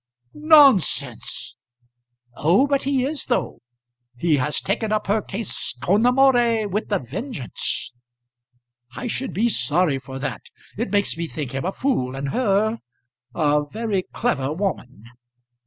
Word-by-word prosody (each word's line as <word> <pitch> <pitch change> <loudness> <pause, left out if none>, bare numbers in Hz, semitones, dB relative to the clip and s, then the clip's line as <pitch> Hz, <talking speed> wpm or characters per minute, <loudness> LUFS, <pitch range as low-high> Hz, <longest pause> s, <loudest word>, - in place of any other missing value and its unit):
"Nonsense!" 275 - +3 0.8
"Oh, 175 - +3
but 280 -2 0
he 270 -2 +1
is 295 +1 -3
though. 245 - -1 0.6
He 155 +3 +2
has 145 +3 0
taken 215 +2 -2
up 215 0 0
her 210 +2 +1
case 205 - -4
con 205 - +2
amore 245 -4 +3
with 210 +2 -3
a 200 - +3
vengeance." 145 - -4 1.0
"I - - -5
should 250 +2 -3
be 225 +4 +1
sorry 150 - +1
for 135 0 -9
that. 135 -4 -4 0.3
It 230 +5 -3
makes 205 -1 +1
me 165 0 -3
think 150 -5 -5
him 135 +2 -3
a 190 - 0
fool, 135 - -1
and 135 +1 -3
her 220 - +1 0.6
a 150 -2 +2
very 215 -3 -1
clever 145 - -1
woman." 155 - -4
200 Hz, 140 wpm, -22 LUFS, 145-240 Hz, 1.0 s, Nonsense